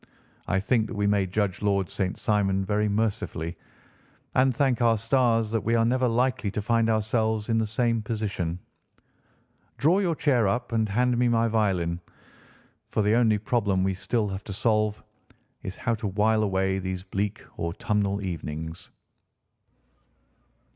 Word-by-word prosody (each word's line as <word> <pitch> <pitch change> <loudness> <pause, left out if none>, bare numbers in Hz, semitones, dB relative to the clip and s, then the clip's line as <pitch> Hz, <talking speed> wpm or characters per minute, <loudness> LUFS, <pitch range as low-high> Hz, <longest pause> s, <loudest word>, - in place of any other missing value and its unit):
I 95 - +1
think 110 +2 +1
that 115 - -7
we 105 0 0
may 100 -2 +2
judge 95 0 -1
Lord 100 -3 +1
St. 95 -3 -2
Simon 95 -2 +1
very 105 +1 +1
mercifully 100 -6 -2 0.8
and 130 +1 +4
thank 130 -3 +1
our 115 -1 +4
stars 115 -1 +2
that 115 -1 0
we 115 +1 +1
are 115 0 +3
never 125 +2 +2
likely 120 -2 +1
to 105 - -3
find 115 +1 +2
ourselves 110 0 0
in 115 0 +2
the 110 - 0
same 115 +1 0
position. 105 -6 -3 1.2
Draw 160 - +3
your 175 -5 +1
chair 125 -8 +2
up 120 +5 -1
and 110 -2 +1
hand 125 +4 +2
me 125 - +3
my 115 -1 +2
violin, 95 -6 0 0.9
for 110 - 0
the 105 +1 +3
only 115 -2 +4
problem 105 -4 0
we 95 - +1
have 95 - -10
still 105 -5 0
to 100 0 -7
solve 105 0 0 0.6
is 95 - -6
how 115 - -1
to 110 -1 -3
while 110 +3 +2
away 95 -2 0
these 95 -1 -4
bleak 95 +1 -3
autumnal 100 +2 -1
evenings." 80 0 -5
105 Hz, 155 wpm, -26 LUFS, 95-115 Hz, 1.2 s, and